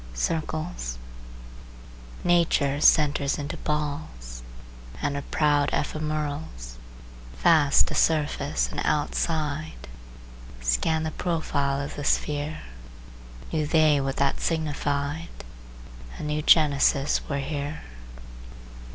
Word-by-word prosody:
CIRCLES 155 - -3 1.3
Nature 160 -5 +2
centres 145 -3 +4
into 145 0 -4
balls, 145 - -4 0.6
And 145 -1 -1
her 140 - -2
proud 145 -1 +1
ephemerals, 150 - -3 0.6
Fast 155 -5 +5
to - - -4
surface 150 -2 +1
and - - -3
outside, 150 - -1 0.7
Scan - - +1
the 160 - -2
profile 145 -5 -1
of 140 0 -5
the 145 - -4
sphere; 150 +2 -1 0.9
Knew 155 -2 0
they 155 -2 +4
what 135 0 -2
that 140 -1 0
signified, 150 0 -2 0.9
A - - -7
new 150 0 -1
genesis 145 -2 +4
were 140 - -1
here. 145 +2 -4
150 Hz, 95 wpm, -26 LUFS, 140-155 Hz, 1.3 s, Fast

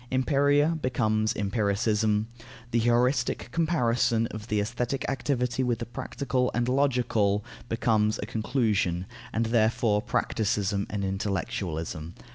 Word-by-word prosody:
Empiria 145 +4 +2
becomes 110 -4 +1
empiricism, 105 +1 +1 0.4
the 120 - +2
heuristic 125 +2 +1
comparison 120 -8 +2
of 110 0 -7
the 105 -2 0
aesthetic 120 +5 -2
activity 130 -2 -1
with 120 -2 +1
the 115 - -5
practical 125 +1 -2
and 120 0 +1
logical, 125 -6 +1 0.2
becomes 110 -2 +2
a - - -4
conclusion, 105 -6 0 0.3
and 115 +1 0
therefore 110 -2 +2
practicism 105 -4 0
and 100 -2 -2
intellectualism. 95 -5 -3
115 Hz, 110 wpm, -27 LUFS, 105-125 Hz, 0.4 s, Empiria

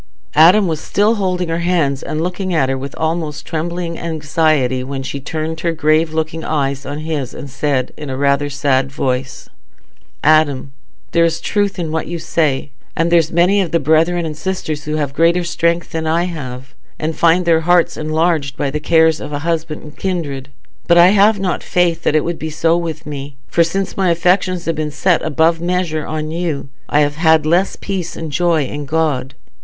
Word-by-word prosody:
Adam 180 +6 +6
was 160 -2 -2
still 210 +2 +2
holding 185 -5 -1
her 165 +1 -1
hands 165 -6 +1
and 155 - -3
looking 180 0 -2
at 135 -4 +2
her 135 - 0
with 135 +1 -6
almost 160 -1 -2
trembling 170 +1 -3
anxiety, 155 -5 0
when 135 0 -5
she 140 +1 -5
turned 160 +3 -4
her 170 0 -1
grave 155 +1 +2
loving 160 0 -3
eyes 140 -3 -2
on 145 +1 -4
his 155 -5 -3
and 140 - -8
said, 135 -2 -1
in 150 -2 -7
rather 140 +2 +1
a - - -6
sad 135 -1 0
voice, 130 -2 -3 0.8
"Adam 145 -3 +3 0.4
there 170 - +3
is 165 0 +1
truth 205 +2 -1
in 165 -3 -3
what 160 0 -2
you 175 - -4
say, 150 -4 -1 0.2
and 165 +1 +1
there's 165 -2 +3
many 180 +4 +3
of 180 - -2
the 170 - +2
brethren 165 +3 +2
and 155 -1 -4
sisters 155 -3 -4
who 150 0 -2
have 145 -3 -2
greater 170 +3 +3
strength 170 0 0
than 160 -1 -3
I 165 +2 +2
have, 135 -7 -6 0.2
and 155 +1 -3
find 170 +3 +3
their 165 -1 +3
hearts 175 +1 +3
enlarged 155 -2 0
by 140 - -1
the 150 - -2
cares 160 0 +3
of - - -7
husband 160 +1 -2
and 150 0 -12
kindred. 145 -8 -3 0.4
But 170 - +5
I 175 +1 +8
have 205 +1 +4
not 190 -2 -1
faith 175 -2 +1
that - - +1
it 155 - +3
would 170 0 -3
be 160 - -4
so 165 +2 +1
with 165 -2 -4
me, 140 -1 -7
for 170 - +3
since 190 +4 -2
my 190 -2 +1
affections 180 +1 +1
have 165 - 0
been 155 0 -2
set 170 +3 +1
above 160 +2 +1
measure 175 -3 -1
on 155 0 -3
you, 165 -5 -3 0.2
I 150 - +3
have 145 0 0
had 160 -2 +4
less 175 +5 +2
peace 185 -4 -4
and 160 -2 -5
joy 170 0 +2
in 145 +2 -6
God. 145 -4 -1
160 Hz, 195 wpm, -17 LUFS, 145-170 Hz, 0.8 s, I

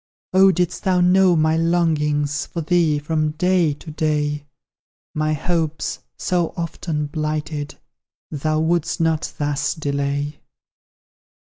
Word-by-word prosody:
Oh, 190 +1 +7
didst 180 -1 -1
thou 185 -1 +2
know 180 0 +5
my 155 0 +3
longings 150 -3 +1
For 170 - -4
thee, 160 -2 +2
from 155 +1 -1
day 175 -2 +2
to 155 +2 -10
day, 150 -1 -1 0.7
My 155 0 0
hopes, 160 0 -1 0.2
so 175 -2 -1
often 165 -2 -3
blighted, 150 -1 -3 0.6
Thou 155 +1 0
wouldst 165 0 0
not 160 -1 0
thus 145 -1 -1
delay! 145 -1 -2
155 Hz, 115 wpm, -21 LUFS, 150-170 Hz, 0.7 s, Oh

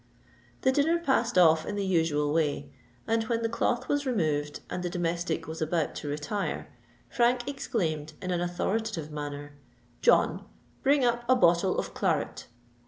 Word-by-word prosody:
The 260 - +4
dinner 295 +5 +3
passed 265 - +1
off 160 -3 +6
in 205 - -4
the 200 -1 -1
usual 160 -5 +1
way; 155 -3 0 0.3
and 225 0 +1
when 230 0 -1
the - - +2
cloth 240 +2 0
was 290 0 +1
removed 155 - -1
and 180 - -4
the 175 - -2
domestic 170 -1 -2
was 160 +1 -6
about 160 0 0
to - - -6
retire, 150 +8 -3 0.4
Frank 240 0 +1
exclaimed 160 - -2
in 185 -2 -4
an 175 -1 0
authoritative 175 -1 -2
manner, 145 -1 -6 0.5
"John, - - +3 0.4
bring 275 -1 +3
up 240 0 +1
a 255 - +7
bottle 180 -4 +3
of - - -3
claret." - - -1
180 Hz, 160 wpm, -28 LUFS, 155-240 Hz, 0.5 s, a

